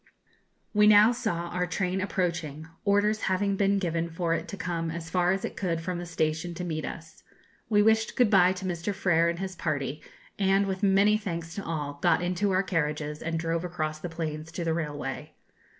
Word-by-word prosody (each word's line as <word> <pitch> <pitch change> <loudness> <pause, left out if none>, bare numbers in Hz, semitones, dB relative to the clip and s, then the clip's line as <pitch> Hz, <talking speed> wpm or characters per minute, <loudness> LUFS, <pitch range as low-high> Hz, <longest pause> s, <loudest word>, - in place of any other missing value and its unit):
We 210 0 +5
now 210 +2 +8
saw 175 -8 -2
our 180 +1 -1
train 185 +1 -1
approaching, 170 -6 -2 0.2
orders 210 +1 +2
having 195 +1 +1
been 200 0 +2
given 170 -3 -1
for 165 0 -1
it 165 -1 -2
to 200 - -7
come 165 -2 -2
as 165 0 -6
far 180 0 +3
as 195 +1 -1
it - - -6
could 170 -4 -1
from 175 +1 -3
the 175 - -6
station 165 +1 -1
to 180 - -4
meet 155 -3 -3
us. 160 -1 -9 0.5
We 205 -2 +4
wished 220 +1 +3
good 245 -4 +3
bye 185 -2 +6
to 185 0 -7
Mr. 180 +2 -2
Frer 170 -3 +3
and 170 - -2
his 190 0 -4
party, 150 -3 -2 0.4
and, 195 0 +3
with 190 -1 -3
many 200 +1 +4
thanks 170 -5 -5
to 200 - -5
all, 145 -3 -4
got - - +3
into 180 +3 0
our 190 0 +2
carriages 150 -4 -2
and 165 0 -2
drove 165 +1 -1
across 155 -3 -3
the 175 - -5
plains 160 -1 -5
to 175 - -3
the 165 -1 0
railway. 145 -4 -4
175 Hz, 200 wpm, -28 LUFS, 165-195 Hz, 0.5 s, now